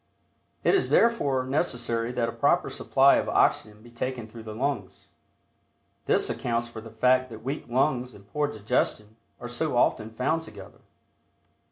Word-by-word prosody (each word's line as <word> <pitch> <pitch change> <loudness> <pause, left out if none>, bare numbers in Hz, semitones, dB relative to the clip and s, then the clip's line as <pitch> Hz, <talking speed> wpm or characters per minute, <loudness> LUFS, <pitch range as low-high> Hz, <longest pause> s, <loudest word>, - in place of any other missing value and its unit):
It - - +4
is 390 - +2
therefore 145 - +3
necessary 120 -5 -1
that 120 -2 0
a - - -3
proper - - +1
supply - - +4
of - - -1
oxygen 105 0 +1
be 120 - -15
taken 120 -1 -4
through 115 +1 -11
the 110 -1 -8
lungs. 135 +3 -3 1.0
This - - +3
accounts 120 -1 -2
for 115 -1 -9
the 115 - -10
fact 130 +3 +2
that 110 -1 -10
weak 135 +4 -4
lungs 125 0 0
and 100 0 -16
poor 150 +6 -1
digestion 110 -2 -2 0.2
are 120 - -6
so 120 +3 -2
often 110 -2 +2
found 125 +8 -1
together. 160 - -12
120 Hz, 160 wpm, -26 LUFS, 110-135 Hz, 1.0 s, It